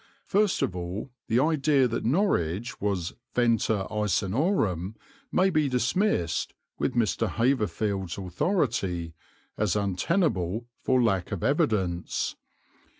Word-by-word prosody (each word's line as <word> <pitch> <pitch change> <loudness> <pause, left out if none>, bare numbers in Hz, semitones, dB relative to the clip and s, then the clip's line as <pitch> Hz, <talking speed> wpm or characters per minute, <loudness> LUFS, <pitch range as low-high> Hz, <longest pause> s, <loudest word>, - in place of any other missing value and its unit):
First 205 0 +2
of 90 - -1
all 90 +8 -5 0.2
the 115 - +3
idea 145 -2 +3
that 115 0 -3
Norwich 120 - 0
was 95 -4 -1 0.2
Venta 115 -4 +2
Icenorum 105 - 0 0.4
may 190 +1 +3
be 155 -4 +2
dismissed, 125 - 0 0.2
with - - 0
Mr. 115 -1 +1
Haverfield's 105 -6 0
authority, 95 - -1 0.5
as 105 -3 +1
untenable 105 - 0
for 130 -1 +2
lack 95 -5 +1
of 100 -5 -3
evidence. 105 - 0
110 Hz, 105 wpm, -27 LUFS, 95-140 Hz, 0.5 s, the